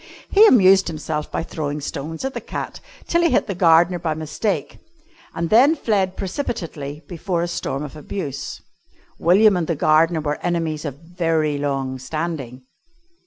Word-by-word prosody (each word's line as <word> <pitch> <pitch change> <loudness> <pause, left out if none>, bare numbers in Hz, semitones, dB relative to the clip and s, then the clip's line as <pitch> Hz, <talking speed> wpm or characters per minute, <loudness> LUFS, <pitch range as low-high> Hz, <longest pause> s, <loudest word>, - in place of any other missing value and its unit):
He 425 +2 +8
amused 190 - +6
himself 155 -1 -4
by - - -2
throwing 150 -2 -4
stones 155 - -5
at 270 - -3
the - - -5
cat - - -6 0.3
till 340 - +2
he 340 - +3
hit - - +2
the 200 - -3
gardener 175 0 +4
by 160 -2 -2
mistake 160 +7 -3 0.6
and 170 0 -2
then 265 +8 +6
fled 195 - 0
precipitately 165 - -4
before 175 0 -2
a - - -1
storm 150 -4 -3
of 150 0 -8
abuse. 150 -2 -5 0.6
William 195 +4 +5
and 170 -3 -1
the 170 - 0
gardener 160 +2 +3
were 150 -1 -2
enemies 165 -3 -2
of 140 -3 -4
very 165 -4 0
long 135 -2 -2
standing. 135 -4 -5
165 Hz, 160 wpm, -21 LUFS, 150-185 Hz, 0.6 s, He